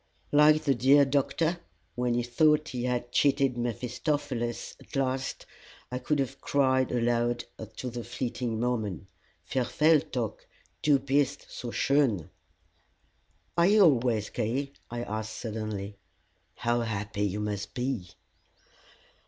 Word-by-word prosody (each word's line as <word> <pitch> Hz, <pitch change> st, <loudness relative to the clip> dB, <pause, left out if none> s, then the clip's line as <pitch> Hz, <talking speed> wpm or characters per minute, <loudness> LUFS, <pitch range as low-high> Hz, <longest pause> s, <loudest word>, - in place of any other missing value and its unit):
Like 150 Hz, +1 st, +6 dB
the 140 Hz, -3 st, +3 dB
great 135 Hz, +3 st, +5 dB
Doctor, 160 Hz, +5 st, +1 dB, 0.3 s
when 125 Hz, -1 st, 0 dB
he 120 Hz, -, +1 dB
thought 150 Hz, +5 st, +3 dB
he 125 Hz, -2 st, -3 dB
had 120 Hz, -1 st, -2 dB
cheated 140 Hz, -2 st, +3 dB
Mephistopheles 120 Hz, +1 st, -2 dB
at -, -, -13 dB
last, 135 Hz, 0 st, -1 dB, 0.5 s
I 125 Hz, -, -2 dB
could 150 Hz, +3 st, 0 dB
have 135 Hz, -1 st, -2 dB
cried 130 Hz, -2 st, +2 dB
aloud 120 Hz, 0 st, +1 dB, 0.3 s
to 125 Hz, +1 st, -5 dB
the 120 Hz, 0 st, -5 dB
fleeting 120 Hz, -3 st, -3 dB
moment, 110 Hz, -, -1 dB, 0.4 s
Verweile 150 Hz, -, +2 dB
dock, 115 Hz, -5 st, -3 dB, 0.3 s
du 145 Hz, -2 st, +5 dB
bist 140 Hz, +1 st, 0 dB
so 125 Hz, -, -6 dB
schön! 120 Hz, -, +1 dB, 1.2 s
"Are 170 Hz, +1 st, +4 dB
you 210 Hz, +1 st, +5 dB
always 120 Hz, -, +3 dB
gay?" 135 Hz, +6 st, -1 dB, 0.2 s
I 120 Hz, 0 st, -4 dB
asked, 110 Hz, 0 st, -4 dB
suddenly. 105 Hz, -3 st, -5 dB, 0.6 s
"How 120 Hz, 0 st, 0 dB
happy 105 Hz, -2 st, -3 dB
you 105 Hz, 0 st, 0 dB
must 105 Hz, 0 st, -4 dB
be!" 125 Hz, -7 st, -2 dB
125 Hz, 125 wpm, -28 LUFS, 115-140 Hz, 1.2 s, Like